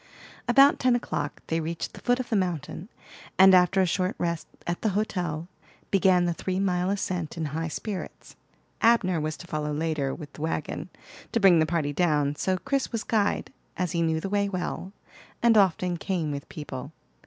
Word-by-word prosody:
About 275 +4 +6
ten 255 -1 +3
o'clock 145 -11 -3
they 165 - -1
reached 165 +1 -4
the - - -10
foot 245 0 +2
of 255 - -4
the 225 - +1
mountain; 180 0 -2 0.5
and 190 0 +8
after 185 +1 +5
a - - +4
short 185 +2 0
rest 170 -1 -2 0.2
at 175 0 -3
the 220 - +1
hotel, 175 -6 -2 0.4
began 185 -2 +4
the 175 - +1
three 185 +2 -3
mile 180 -2 +1
ascent 180 -5 -2
in 160 - -2
high 165 +1 -2
spirits. 190 +5 -6 0.5
Abner 200 -8 +3
was 155 0 -3
to - - -10
follow 150 -3 -3
later 150 -2 -1
with 150 -4 -10
the - - -11
wagon, 160 +1 -3 0.4
to 230 - +2
bring 190 -5 +6
the 155 - +3
party 155 -3 -1
down; 150 -3 +1
so 185 +4 0
Chris 275 +8 -1
was 230 -3 -2
guide, 210 -3 0 0.2
as 180 -3 -1
he 170 - 0
knew 160 -1 +1
the 180 - -4
way 200 0 +1
well, 185 0 -4 0.5
and 235 -1 +5
often 185 -3 +3
came 170 -4 -2
with 140 -1 -6
people. 140 -2 -7
180 Hz, 190 wpm, -26 LUFS, 160-195 Hz, 0.5 s, and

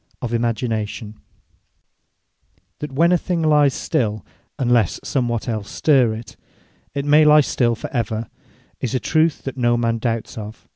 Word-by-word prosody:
OF 120 -1 -3
IMAGINATION 110 -2 -2 1.7
That 150 -1 -5
when 165 +6 +3
a 180 - +3
thing 170 -1 -2
lies 150 -3 +4
still, 110 -4 -1 0.3
unlesse 120 -6 +2
somewhat 120 -4 -1
els 110 -3 -3
stirre 125 -7 +2
it, 115 -1 -11 0.6
it 140 0 -2
will 150 +1 +5
lye 150 0 +7
still 120 -4 +1
for - - -7
ever, 115 -3 -2 0.5
is 130 +1 -2
a - - +2
truth 155 +6 +1
that 135 0 -6
no 120 -1 +2
man 115 -1 0
doubts 115 -1 -3
of. 105 +1 -10
120 Hz, 150 wpm, -21 LUFS, 115-145 Hz, 1.7 s, lye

